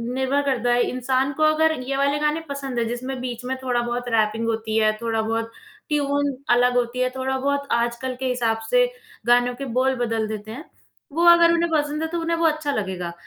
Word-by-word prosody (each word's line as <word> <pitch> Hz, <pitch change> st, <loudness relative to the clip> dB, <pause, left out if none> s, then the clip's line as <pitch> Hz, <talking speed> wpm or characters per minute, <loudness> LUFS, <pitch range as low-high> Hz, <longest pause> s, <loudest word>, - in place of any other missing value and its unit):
निर्भर 265 Hz, +2 st, +1 dB
करता 245 Hz, -3 st, +1 dB
है 245 Hz, -, +3 dB
इंसान 260 Hz, +2 st, 0 dB
को 310 Hz, +3 st, -1 dB
अगर 310 Hz, +1 st, +4 dB
ये 270 Hz, +2 st, -3 dB
वाले 280 Hz, +1 st, +1 dB
गानें 300 Hz, +2 st, 0 dB
पसंद 275 Hz, -3 st, -4 dB
है, 230 Hz, -, +1 dB
जिसमें 255 Hz, +3 st, -4 dB
बीच 250 Hz, -1 st, -5 dB
में 260 Hz, -, -2 dB
थोड़ा-बहुत 245 Hz, -1 st, -1 dB
रैपिंग 220 Hz, 0 st, +1 dB
होती 220 Hz, -1 st, -1 dB
है, 215 Hz, -1 st, +4 dB
थोड़ा-बहुत 225 Hz, 0 st, -1 dB, 0.4 s
ट्यून 285 Hz, -1 st, 0 dB, 0.2 s
अलग 245 Hz, 0 st, +3 dB
होती 245 Hz, 0 st, -1 dB
है, 255 Hz, 0 st, +2 dB
थोड़ा-बहुत 265 Hz, +2 st, -1 dB
आजकल 235 Hz, +2 st, -1 dB
के 265 Hz, -, -3 dB
हिसाब 235 Hz, -3 st, 0 dB
से -, -, +4 dB, 0.4 s
गानों 245 Hz, +1 st, +4 dB
के 275 Hz, -, -2 dB
बोल 265 Hz, 0 st, +2 dB
बदल 225 Hz, -1 st, -1 dB
देते 215 Hz, 0 st, -6 dB
हैं। 280 Hz, +8 st, -8 dB, 0.5 s
वो 335 Hz, +4 st, +1 dB
अगर 340 Hz, 0 st, +7 dB
उन्हें 340 Hz, 0 st, +1 dB
पसंद 300 Hz, 0 st, 0 dB
है, 320 Hz, -, -1 dB
तो 340 Hz, +1 st, -3 dB
उन्हें 330 Hz, 0 st, -1 dB
वो 335 Hz, -, +1 dB
अच्छा 310 Hz, -2 st, +1 dB
लगेगा। 190 Hz, -7 st, -3 dB
255 Hz, 200 wpm, -23 LUFS, 235-285 Hz, 0.5 s, अगर